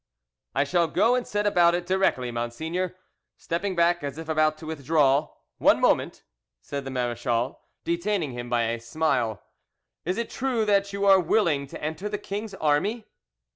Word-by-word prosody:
"I 135 - +3
shall 170 +3 +1
go 225 +9 +3
and 250 -1 0
set 205 0 -1
about 175 -4 +4
it 175 0 -3
directly, 185 -10 +1
monseigneur," 160 +11 -3 0.4
stepping 185 +3 -2
back 170 -1 +2
as 140 +1 -4
if 160 -1 -7
about 155 -1 +2
to 160 - -11
withdraw. 150 -1 +2 0.3
"One - - +5
moment!" - - +1 0.4
said 140 - -6
the - - -4
marechal, 120 -1 -1 0.2
detaining 170 -2 -1
him 120 0 -6
by 120 -1 +2
a 115 +1 -1
smile. 120 -3 -1 0.6
"Is 180 +3 -2
it 235 - -3
true 245 -4 0
that 200 -1 +2
you 200 0 -2
are 195 -1 +7
willing 165 -6 +1
to - - -10
enter 160 +7 -3
the 210 - -2
king's 205 +1 -5
army?" 195 +10 0
160 Hz, 170 wpm, -26 LUFS, 135-195 Hz, 0.6 s, are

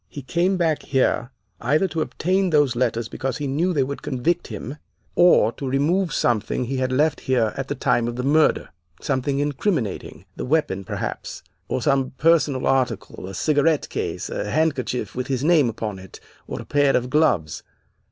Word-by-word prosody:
He 140 +5 -8
came 175 +7 +1
back 165 -4 +1
here 130 -3 0 0.3
either 150 +10 +2
to 160 -1 -2
obtain 185 +4 0
those 145 -6 +3
letters 115 -2 0
because 130 +1 -3
he 150 - -4
knew 155 +7 0
they 145 -6 +2
would 140 +2 -5
convict 155 +7 -1
him, 120 +5 -7 0.4
or 175 -11 +5
to 135 +2 -5
remove 165 +7 +1
something 120 -3 0
he 130 +2 -3
had 130 0 0
left 150 +3 +2
here 120 -4 +1
at - - -4
the - - -3
time 120 - +1
of 120 - -3
the 125 - -3
murder, 150 +3 +2 0.3
something 135 +2 -1
incriminating, 145 - -2
the - - -5
weapon, 130 -9 0
perhaps, - - -5 0.2
or 130 - -2
some 135 -3 +1
personal 150 -4 +3
article; 130 -7 -1
a 95 - -7
cigarette 150 - +1
case, - - -3
a - - -3
handkerchief 145 -5 -1
with 125 +1 -4
his 135 -1 -1
name 155 -6 +4
upon 105 -3 -5
it, 95 0 -12 0.3
or - - -5
a - - -8
pair 145 -1 +3
of 125 +1 -3
gloves. 125 - +1
135 Hz, 180 wpm, -23 LUFS, 125-155 Hz, 0.4 s, or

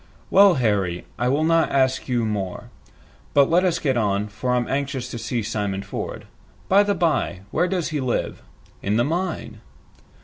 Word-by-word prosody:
"Well, 195 -2 +7
Harry, 100 -8 0
I 120 - +1
will 140 +4 +2
not 165 0 +3
ask 130 -1 +1
you 120 -2 +1
more. 100 -4 -4 0.6
But 140 +1 +5
let 175 +2 +4
us 175 -3 +2
get 135 -6 0
on, 105 -1 0
for 125 +4 -1
I'm 120 -1 0
anxious 135 -2 -2
to 120 - -5
see 120 0 -2
Simon 100 -2 -2
Ford. - - -6 0.4
By 195 +2 +5
the 205 0 +1
bye, 160 - 0
where 180 - +1
does 180 -3 -1
he 150 -3 -2
live?" 130 -2 -2 0.4
"In 105 +2 0
the 120 - +3
mine." 160 - -3
130 Hz, 175 wpm, -23 LUFS, 105-165 Hz, 0.6 s, Well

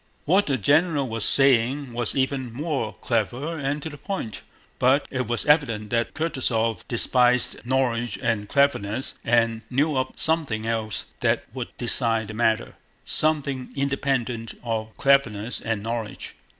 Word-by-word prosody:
What 190 +6 +3
the 135 -2 +1
general 145 - +2
was 115 -2 -1
saying 135 +1 +3
was 120 -1 0
even 130 -2 -1
more 135 -4 -3
clever 125 +8 -1
and 140 +1 -2
to 160 - -4
the 145 - -11
point, 150 - -5 0.4
but 130 +3 +3
it 130 -3 -2
was 120 0 0
evident 115 -9 +2
that 115 0 0
Kutúzov 115 - 0
despised 125 +1 +2
knowledge 120 -4 0
and 105 -2 -1
cleverness, 130 -4 +1
and 115 -1 +2
knew 145 +4 +1
of 130 0 -1
something 150 -9 0
else 110 -4 -2
that - - +1
would 125 -2 -4
decide 115 -3 +2
the - - -6
matter—something 130 +5 -1
independent 135 -4 -1
of 110 -2 -4
cleverness 125 -5 +2
and 110 -2 -2
knowledge. 115 -2 -5
125 Hz, 135 wpm, -24 LUFS, 115-140 Hz, 0.4 s, What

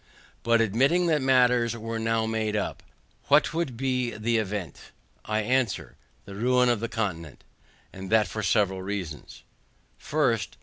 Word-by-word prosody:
But 115 0 +3
admitting 135 - +2
that 155 -4 +2
matters 125 -3 +3
were 115 0 -4
now 115 0 0
made 110 -1 -1
up, 105 - -3 0.5
what - - +4
would 160 -8 -2
be 125 -1 0
the 115 +1 -1
event? 100 -6 -5 0.4
I 110 0 0
answer, 105 - -1 0.3
the 100 - -10
ruin 125 +4 +2
of 120 -3 +1
the 115 +1 -4
continent. 85 - -4 0.5
And 95 0 -8
that 110 -1 +3
for 110 - -5
several 100 -3 +1
reasons. 95 -6 -6 0.6
FIRST. - - -1
110 Hz, 145 wpm, -26 LUFS, 105-125 Hz, 0.6 s, what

